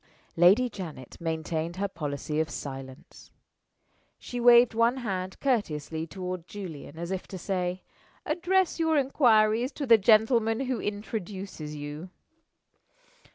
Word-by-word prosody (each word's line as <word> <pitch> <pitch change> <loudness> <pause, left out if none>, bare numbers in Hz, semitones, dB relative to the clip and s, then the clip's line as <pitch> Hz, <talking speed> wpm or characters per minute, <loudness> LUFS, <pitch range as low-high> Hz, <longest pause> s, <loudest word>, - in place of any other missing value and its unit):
Lady 190 +9 +5
Janet 170 - -8
maintained 160 0 -2
her 200 +2 -1
policy 150 -3 -4
of 160 - 0
silence. 135 -1 -9 0.9
She 245 - -6
waved 240 0 +7
one 230 +3 +2
hand 185 -2 -3
courteously 160 - -1
toward 180 0 -6
Julian, 160 -7 -8
as 170 +2 -5
if 190 -1 -4
to 190 - -7
say, 180 -1 -2 0.4
"Address 355 +3 +1
your 320 -1 +2
inquiries 240 -3 +3
to 285 - -4
the 230 -3 +6
gentleman 225 +2 +4
who 260 -2 -2
introduces 195 -6 -5
you." 150 +4 -7
195 Hz, 120 wpm, -28 LUFS, 160-235 Hz, 0.9 s, waved